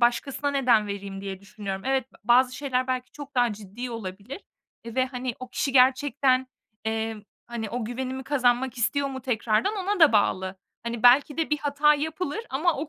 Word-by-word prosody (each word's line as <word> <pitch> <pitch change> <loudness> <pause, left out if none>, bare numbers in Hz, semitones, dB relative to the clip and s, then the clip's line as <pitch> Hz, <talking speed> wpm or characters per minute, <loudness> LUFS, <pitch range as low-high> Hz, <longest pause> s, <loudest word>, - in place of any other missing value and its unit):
başkasına 265 +4 +1
neden 245 -6 +3
vereyim 200 -1 -6
diye 195 -1 -6
düşünüyorum. 200 -1 -6
Evet, 265 -1 0
b - - -18
bazı 250 +1 +4
şeyler 255 -3 -1
belki 255 -1 -2
çok 285 -1 -10
daha 245 -2 +3
ciddi 210 +4 -7
olabilir 210 - -7 0.5
ve, 255 +3 0
hani, 250 -2 -4
o 255 - -8
kişi 275 - -2
gerçekten, 260 0 +3 0.4
emm, 220 -1 -2 0.2
hani, 230 -3 -5
o 245 -1 -3
güvenimi 260 +3 -4
kazanmak 255 -2 +1
istiyor 275 +4 +1
mu 265 -1 -6
tekrardan 245 - 0
ona 395 0 -1
da 315 -7 +7
bağlı. 190 -2 +1 0.3
Hani, 235 0 -4
belki 270 +4 +6
de 325 -1 -1
bir 300 - +2
hata 290 +1 +3
yapılır 315 +5 -3
ama 315 +5 +1
o 295 +2 -4
255 Hz, 175 wpm, -26 LUFS, 225-280 Hz, 0.5 s, da